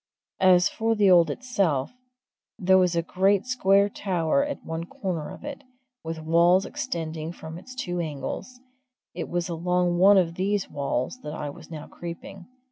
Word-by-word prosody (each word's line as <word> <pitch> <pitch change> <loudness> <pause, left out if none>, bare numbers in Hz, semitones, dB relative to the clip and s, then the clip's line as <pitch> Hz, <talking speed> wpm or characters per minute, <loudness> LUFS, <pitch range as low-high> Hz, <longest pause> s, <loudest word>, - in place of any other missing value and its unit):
As 185 -1 +5
for 225 0 0
the 205 -3 +4
old 170 -3 +6
itself, 185 - -1 0.7
there 190 0 +4
was 180 -2 +2
a 170 - +1
great 195 +4 +2
square 200 -6 +3
tower 190 - 0
at 290 0 -5
one 165 0 -4
corner 170 -3 -4
of - - -10
it, 285 -1 -7 0.4
with 160 -1 -5
walls 170 +4 +4
extending 160 -1 -4
from 160 -1 -9
its 255 +7 -12
two 180 -9 -3
angles; 170 - -5 0.5
it - - -5
was 175 -1 -1
along 175 +1 0
one 200 +2 +7
of 170 -3 +2
these 195 +2 -1
walls 140 - -2
that 150 - -6
I 145 -2 -4
was - - -14
now 155 -2 -7
creeping. 175 +2 -9
180 Hz, 165 wpm, -26 LUFS, 165-195 Hz, 0.7 s, one